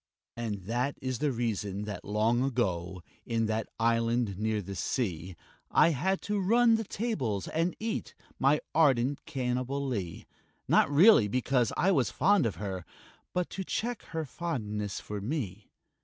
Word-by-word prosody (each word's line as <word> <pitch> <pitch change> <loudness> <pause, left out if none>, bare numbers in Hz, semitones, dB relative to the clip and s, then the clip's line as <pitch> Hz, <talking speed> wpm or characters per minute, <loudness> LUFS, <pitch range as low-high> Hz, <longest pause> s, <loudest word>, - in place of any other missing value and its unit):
And 110 -5 -4
that 120 +7 -1
is 130 -2 -3
the 150 -1 +1
reason 105 -4 -2
that 105 -3 -6
long 110 +4 +1
ago, 95 -9 -1 0.2
In 115 -1 0
that 110 0 -2
island 115 -2 +1
near 110 0 0
the 100 0 -6
sea, 95 - -2 0.3
I - - +5
had 185 +6 0
to 205 -2 -1
turn 235 0 +5
the 225 0 +2
tables 190 - -2
and 165 +3 0
eat 225 0 -3 0.2
My 140 +3 +3
ardent 140 -3 +3
Cannibalee 125 - -2 0.4
Not - - +4
really 150 - +7
because 125 +1 +1
I 195 - +3
was 130 - +2
fond 190 - +3
of 105 - -4
her, 95 -3 -4 0.5
But 180 -1 -2
to 195 - -4
check 235 +5 -2
her 160 -1 -4
fondness 105 - -3
for 105 -1 -6
me. 105 - -4
120 Hz, 150 wpm, -30 LUFS, 105-155 Hz, 0.5 s, really